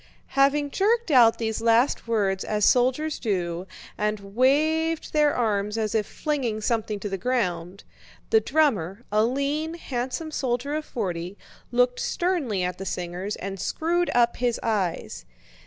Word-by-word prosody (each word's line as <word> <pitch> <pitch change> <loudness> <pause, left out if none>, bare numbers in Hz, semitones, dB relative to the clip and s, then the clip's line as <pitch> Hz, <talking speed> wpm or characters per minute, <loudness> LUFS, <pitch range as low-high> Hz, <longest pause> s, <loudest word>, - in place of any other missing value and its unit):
Having 280 +1 +3
jerked 450 +1 +1
out 235 -4 +6
these 220 -1 -2
last 230 +2 +2
words 200 -4 0
as 210 -1 0
soldiers 260 +5 +2
do 180 -4 -2 0.3
and 210 0 0
waved 310 +6 +2
his 305 - +3
arms 220 -7 +1
as 215 -2 -1
if 215 -2 0
flinging 265 -8 -2
something 215 -1 -1
to 205 - -3
the 195 -1 -4
ground, 185 -6 -2 0.5
the 445 - +6
drummer—a 215 - +1
lean, 280 +6 -1
handsome 260 +1 -4
soldier 260 0 -2
of 305 0 -2
forty—looked 210 +6 -2
sternly 300 - -1
at 180 0 -3
the - - -4
singers 180 +4 -4
and 195 0 -6
screwed 345 - 0
up 240 -1 +3
his 240 -1 0
eyes. 200 -7 -2
235 Hz, 140 wpm, -25 LUFS, 205-285 Hz, 0.5 s, out